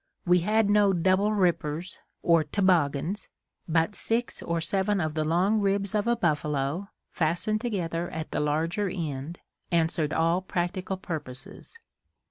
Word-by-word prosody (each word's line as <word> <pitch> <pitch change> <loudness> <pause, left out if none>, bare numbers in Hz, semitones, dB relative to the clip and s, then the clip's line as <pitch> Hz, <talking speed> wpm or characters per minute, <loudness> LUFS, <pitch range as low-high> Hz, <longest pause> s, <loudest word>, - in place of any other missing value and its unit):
We 180 0 +5
had 210 +4 +2
no 205 -1 +4
"double 185 +4 +2
rippers" 175 -4 0 0.2
or 165 -2 +4
toboggans, 175 +1 +1 0.4
but 165 +4 +2
six 230 +3 -1
or 170 0 -1
seven 195 +4 0
of 155 -3 -1
the 155 0 0
long 180 +7 +2
ribs 200 0 +1
of 210 +1 0
a 235 - +3
buffalo, 150 -2 -1 0.2
fastened 180 +7 0
together 175 -7 -2
at 160 0 -6
the - - -1
larger 165 +7 0
end, 160 -2 -4 0.3
answered 160 -2 +1
all 165 +3 +2
practical 185 +1 -2
purposes. 155 - -7
175 Hz, 135 wpm, -27 LUFS, 160-200 Hz, 0.4 s, We